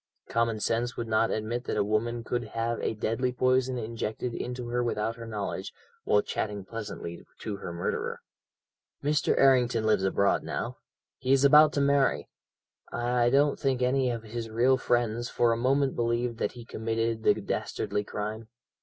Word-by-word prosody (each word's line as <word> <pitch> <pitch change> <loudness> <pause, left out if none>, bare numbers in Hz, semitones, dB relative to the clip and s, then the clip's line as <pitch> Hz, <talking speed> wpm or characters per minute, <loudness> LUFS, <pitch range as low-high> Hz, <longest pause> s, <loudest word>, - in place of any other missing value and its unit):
Common 115 -1 +1
sense 115 +3 -1
would 115 - -3
not 110 +1 +2
admit 115 +3 -2
that - - -2
a - - +3
woman 115 +3 -1
could 120 +1 -2
have 115 0 0
a - - -1
deadly 115 +4 -1
poison 130 0 +1
injected 115 +1 -3
into 125 0 -4
her 120 +1 0
without 115 -1 -1
her 115 -1 -9
knowledge, 105 -3 -4 0.3
while 105 - +3
chatting 105 -2 -3
pleasantly 100 -6 -6 0.2
to 105 -2 -4
her 90 - -6
murderer. 85 0 -3 0.8
"Mr. 150 +1 +2
Errington 125 -4 +4
lives 110 -3 +3
abroad 100 +1 +2
now. - - -4 0.4
He 130 0 -1
is 135 0 +5
about 150 +2 +8
to 140 - +1
marry. 140 -1 +2 0.6
I 120 0 +1
don't 140 +3 +3
think 130 -2 +1
any 130 0 +2
of 115 -2 -3
his 115 +1 -5
real 120 +4 +3
friends 120 -1 0
for 120 -1 +2
a - - +2
moment 135 +3 +1
believed 120 0 -1
that - - -1
he 120 -1 -10
committed 115 0 -2
the - - +4
dastardly 105 - -2
crime. 105 +2 -5
120 Hz, 170 wpm, -28 LUFS, 110-125 Hz, 0.8 s, about